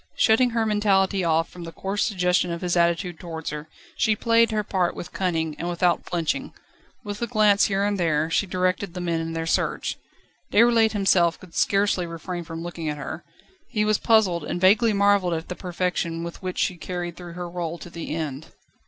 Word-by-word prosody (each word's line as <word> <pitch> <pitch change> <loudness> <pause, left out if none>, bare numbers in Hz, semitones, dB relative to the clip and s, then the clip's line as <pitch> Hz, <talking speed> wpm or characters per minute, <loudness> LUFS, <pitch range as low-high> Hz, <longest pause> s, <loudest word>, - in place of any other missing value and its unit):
Shutting 245 +3 +4
her 230 -1 0
mentality 200 -2 +2
off 165 0 +2
from 175 - -10
the 165 - -7
coarse 195 +4 -2
suggestion 180 -3 +1
of 170 - -4
his 180 -1 0
attitude 170 0 +1
towards 165 -3 -6
her, 150 +1 -7 0.3
she 220 -2 +2
played 230 +1 +3
her 215 -1 0
part 185 -4 0
with - - -8
cunning, 165 -4 -1
and 175 - -2
without 175 0 +1
flinching. 185 - -2 0.5
With 205 0 -6
a 235 - 0
glance 210 -3 +4
here 195 0 0
and 205 -1 0
there, 160 -3 +1
she 200 - +1
directed 185 0 -1
the - - -4
men 170 -2 -1
in 165 0 -4
their 165 0 -3
search. 165 - -1 0.5
Déroulède 230 0 +5
himself 185 -4 +3
could 180 -3 -15
scarcely 195 -3 +1
refrain 170 +1 -5
from 165 0 -7
looking 170 -2 -4
at 150 - -3
her; 160 +3 -6 0.5
he 210 -4 0
was 215 -1 +2
puzzled, 195 -8 +3
and 175 - -3
vaguely 210 +5 +5
marvelled 200 -3 +3
at 160 +1 -6
the 180 - -4
perfection, 175 -2 -2
with 170 0 -7
which 185 -1 -4
she 180 - 0
carried 175 0 -5
through 175 -1 -9
her 175 0 -5
rôle 170 -1 -4
to 170 - -10
the 165 -2 -5
end. 155 -2 -4
180 Hz, 200 wpm, -24 LUFS, 170-205 Hz, 0.5 s, Déroulède